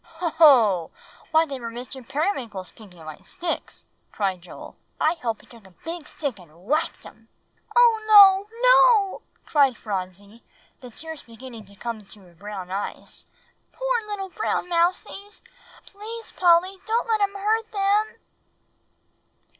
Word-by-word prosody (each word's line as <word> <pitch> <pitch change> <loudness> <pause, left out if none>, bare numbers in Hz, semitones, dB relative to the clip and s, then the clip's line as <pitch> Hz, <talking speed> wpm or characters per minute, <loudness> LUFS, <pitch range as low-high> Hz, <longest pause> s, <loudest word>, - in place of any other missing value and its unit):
"Hoh, 330 0 -5
hoh! 220 - +6 0.4
why, 320 0 +4
they 275 -4 -6
were 235 -1 -6
Mr. 250 +3 -8
Periwinkle's 250 - -3
pink 215 -4 -16
and 165 -2 -14
white 155 -1 -10
sticks," 345 -1 -5 0.3
cried 190 -4 -2
Joel. 175 - -11
"O - - -12 0.3
Polly! 310 - +5
I - - -1
hope 230 -3 -3
he - - -21
took 235 -3 -17
a 185 - -22
big 330 -1 -6
stick 275 -9 -5
and 170 +1 -18
whacked 305 +7 -1
'em." - - -16 0.5
"Oh, 470 -2 +5
no, 405 +1 +7
no!" - - +5 0.2
cried 275 -5 +3
Phronsie, 200 +2 -6 0.4
the 250 - -11
tears 320 +6 -8
beginning 230 -1 -12
to 200 - -17
come 230 +2 -5
into 210 0 -14
her 175 -1 -19
brown 190 0 -8
eyes; 200 +2 -6 0.4
"poor - - -1
little 395 -2 -5
brown 400 -2 -2
mousies. 360 +4 -1 0.4
Please, 445 +3 -9
Polly 360 +2 +3
don't 460 +2 0
let 440 -2 +1
him 400 0 0
hurt 435 +3 -1
them." 410 +1 +1
310 Hz, 155 wpm, -24 LUFS, -, 0.5 s, no